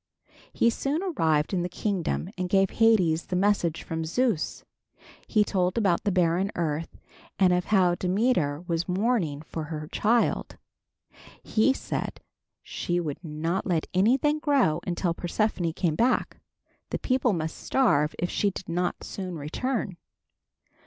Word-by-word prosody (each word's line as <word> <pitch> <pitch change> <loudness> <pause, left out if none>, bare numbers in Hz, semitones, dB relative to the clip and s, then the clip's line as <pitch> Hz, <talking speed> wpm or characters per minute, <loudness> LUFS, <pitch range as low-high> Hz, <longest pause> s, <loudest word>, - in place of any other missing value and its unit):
He 235 - +3
soon 285 +8 -2
arrived 160 - +1
in 180 - +1
the 175 - -2
kingdom 185 -1 -2
and 180 -1 -3
gave 195 0 +3
Hades 185 -8 +3
the 180 - -2
message 180 -4 +1
from 160 0 -3
Zeus. 190 +1 -1 0.6
He 215 -2 +3
told 185 -2 0
about 195 -6 +2
the 205 - +2
barren 180 +2 +2
earth 160 -1 -2 0.4
and 185 -2 +4
of 180 0 +1
how 185 -4 +3
Demeter 180 - +1
was 170 -2 -2
mourning 180 -7 0
for 160 0 -5
her 155 -1 -6
child. 230 +2 +1 0.9
He 220 +5 +3
said 270 - -4 0.4
she 175 0 -2
would 155 0 -4
not 165 +4 -2
let 170 -4 +1
anything 260 +11 +3
grow 275 - +2
until 175 -1 0
Persephone 175 0 -1
came 170 -2 0
back. 245 +6 +1 0.5
The - - -2
people 255 -2 +1
must 160 -2 -3
starve 155 - +2
if 175 - -2
she 205 - +1
did 190 - -8
not 175 +1 -2
soon 185 -3 -5
return. 190 - -3
180 Hz, 145 wpm, -27 LUFS, 165-215 Hz, 0.9 s, and